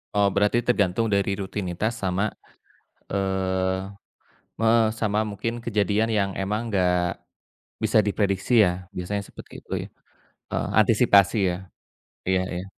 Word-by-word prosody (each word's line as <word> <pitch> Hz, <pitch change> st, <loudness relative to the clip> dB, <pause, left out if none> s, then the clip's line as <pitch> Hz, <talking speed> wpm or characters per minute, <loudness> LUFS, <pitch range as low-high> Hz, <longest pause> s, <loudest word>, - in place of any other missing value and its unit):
Oh, 100 Hz, -1 st, +4 dB
berarti 105 Hz, +4 st, +3 dB
tergantung 115 Hz, -2 st, +1 dB
dari 100 Hz, -1 st, +1 dB
rutinitas 95 Hz, +3 st, -3 dB
sama, 95 Hz, +2 st, 0 dB, 0.9 s
eee, 95 Hz, -1 st, 0 dB, 0.8 s
me 115 Hz, -, +2 dB, 0.3 s
sama 110 Hz, 0 st, +1 dB
mungkin 105 Hz, +2 st, -3 dB
kejadian 105 Hz, 0 st, +1 dB
yang 100 Hz, -2 st, +1 dB
emang 105 Hz, +4 st, -2 dB
nggak 90 Hz, -4 st, +1 dB, 0.7 s
bisa 110 Hz, 0 st, +3 dB
diprediksi 100 Hz, +3 st, +2 dB
ya, 90 Hz, -2 st, +1 dB
biasanya 100 Hz, +3 st, -3 dB
seperti -, -, -13 dB
itu -, -, -21 dB
ya? -, -, -9 dB, 0.6 s
Heeh, -, -, -1 dB
antisipasi 105 Hz, -2 st, +4 dB
ya. 90 Hz, -, -2 dB, 0.7 s
Iya 95 Hz, -1 st, +3 dB
iya. 90 Hz, +1 st, -4 dB
100 Hz, 120 wpm, -24 LUFS, 95-110 Hz, 0.9 s, Oh